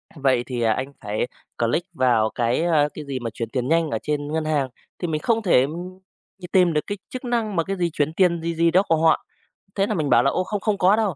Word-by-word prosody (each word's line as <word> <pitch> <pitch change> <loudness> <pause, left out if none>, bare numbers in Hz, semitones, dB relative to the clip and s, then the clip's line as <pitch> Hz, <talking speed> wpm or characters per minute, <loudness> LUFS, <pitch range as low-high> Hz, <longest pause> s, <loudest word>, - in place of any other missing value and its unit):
"Vậy 130 -4 +2
thì, 125 -2 -3
à, 110 -1 +3
anh 130 +4 -4
phải 105 +2 -2 0.3
click 165 +11 -1
vào 120 -7 +2
cái, 120 +6 +1
a" 155 -4 +3
cái 155 - -8
gì 135 -2 -4
mà 120 -2 -4
"chuyển 115 0 -5
tiền 125 +1 -2
nhanh 165 +1 +2
ở - - -1
trên 145 -1 -2
ngân 160 -1 -1
hàng", 145 -4 0 0.3
thì 175 - -2
mình 155 -2 -2
không 225 -1 +1
thể, 180 - +4
ừm, 175 +7 -5 0.5
tìm 180 -3 +4
được 150 - +2
cái 205 - -3
chức 255 - -6
năng 230 -4 -1
mà 165 - +2
cái 195 +4 -3
gì 175 -1 +1
chuyển 150 +1 0
tiền 170 -1 +2
gì 165 +1 -2
gì 170 +1 +3
đó 185 +3 +4
của 165 - +4
họ. 160 +1 +3 0.5
Thế 195 0 +1
là 215 - -1
mình 155 -5 -1
bảo 120 - +5
là 135 - +3
"Ô, - - 0
không 205 +2 -3
không 210 0 0
có 190 +2 +4
đâu". 215 -6 0
160 Hz, 265 wpm, -23 LUFS, 130-185 Hz, 0.5 s, bảo